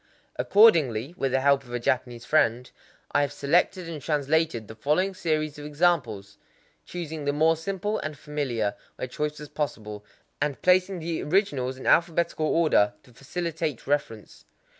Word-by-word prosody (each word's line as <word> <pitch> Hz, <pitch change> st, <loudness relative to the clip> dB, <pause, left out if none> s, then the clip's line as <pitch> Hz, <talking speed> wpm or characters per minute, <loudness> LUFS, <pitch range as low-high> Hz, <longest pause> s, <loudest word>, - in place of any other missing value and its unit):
Accordingly, 160 Hz, -, +4 dB
with 135 Hz, -7 st, -1 dB
the 135 Hz, 0 st, +1 dB
help 140 Hz, 0 st, +3 dB
of 120 Hz, -, -14 dB
a -, -, -1 dB
Japanese 120 Hz, -1 st, -1 dB
friend, 125 Hz, -5 st, +1 dB, 0.4 s
I 145 Hz, -, +3 dB
have 145 Hz, -1 st, 0 dB
selected 170 Hz, +5 st, +1 dB
and 160 Hz, -3 st, -6 dB
translated 150 Hz, -5 st, 0 dB
the -, -, -9 dB
following 150 Hz, -, 0 dB
series 155 Hz, -4 st, -2 dB
of 145 Hz, -, -8 dB
examples,—choosing 150 Hz, -, -3 dB
the 145 Hz, -, +2 dB
more 160 Hz, +2 st, +3 dB
simple 195 Hz, +5 st, -3 dB
and 155 Hz, -1 st, -5 dB
familiar 135 Hz, -9 st, -2 dB, 0.2 s
where -, -, -5 dB
choice 150 Hz, +4 st, -3 dB
was 150 Hz, -1 st, -9 dB
possible, 105 Hz, -8 st, -4 dB, 0.4 s
and 140 Hz, -3 st, -1 dB
placing 185 Hz, 0 st, +3 dB
the 165 Hz, 0 st, -3 dB
originals 145 Hz, -8 st, 0 dB
in 130 Hz, -, -10 dB
alphabetical 170 Hz, -1 st, +2 dB
order 150 Hz, -12 st, +3 dB
to 125 Hz, -, -20 dB
facilitate 160 Hz, +1 st, -4 dB
reference. 140 Hz, -7 st, -3 dB
150 Hz, 150 wpm, -26 LUFS, 130-165 Hz, 0.4 s, Accordingly